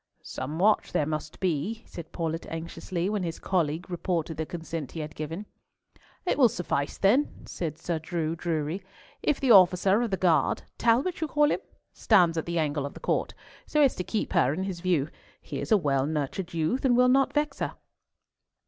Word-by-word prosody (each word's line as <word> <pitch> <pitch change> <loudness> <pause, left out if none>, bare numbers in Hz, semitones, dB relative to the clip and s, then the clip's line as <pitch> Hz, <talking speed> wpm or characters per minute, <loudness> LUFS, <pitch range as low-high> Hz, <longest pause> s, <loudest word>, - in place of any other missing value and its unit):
"Some 150 +4 -5
watch 210 +5 +2
there 150 - +2
must 155 0 -4
be," 190 +6 -1
said 165 -2 -9
Paulett 165 -1 -3
anxiously, 170 +2 -4
when 210 -1 -1
his 165 -2 -3
colleague 170 -2 -1
reported 170 -2 -2
the 160 -1 -3
consent 165 -5 -5
he 165 - -5
had 150 0 -6
given. 160 +7 -5 0.8
"It 355 - 0
will 250 -4 +7
suffice, 155 -7 -2
then," 245 +10 +2
said 160 -3 -4
Sir 165 0 -2
Drew 160 0 -2
Drury, 165 +2 -2 0.4
"if 295 - +1
the 265 -3 +3
officer 190 +1 +6
of 240 - 0
the 190 - -1
guard—Talbot 230 - +1
call 295 0 +3
you - - +2
him?—stands 180 -7 +1
at 160 - -2
the 170 0 -1
angle 145 -3 0
of - - -11
the - - -9
court, - - -1 0.3
so 300 -1 +3
as 275 - +4
to 180 - -3
keep 215 +3 -2
her 165 -8 +4
in 190 - -2
his 190 -3 -4
view. 170 -6 +1 0.3
He - - -6
is - - -6
a 215 - +7
well 140 -6 +1
nurtured 155 +4 -3
youth, 170 +10 0
and 245 -3 +4
will 250 0 +6
not 270 +2 +3
vex 295 -1 0
her." - - -2
175 Hz, 190 wpm, -27 LUFS, 160-210 Hz, 0.8 s, will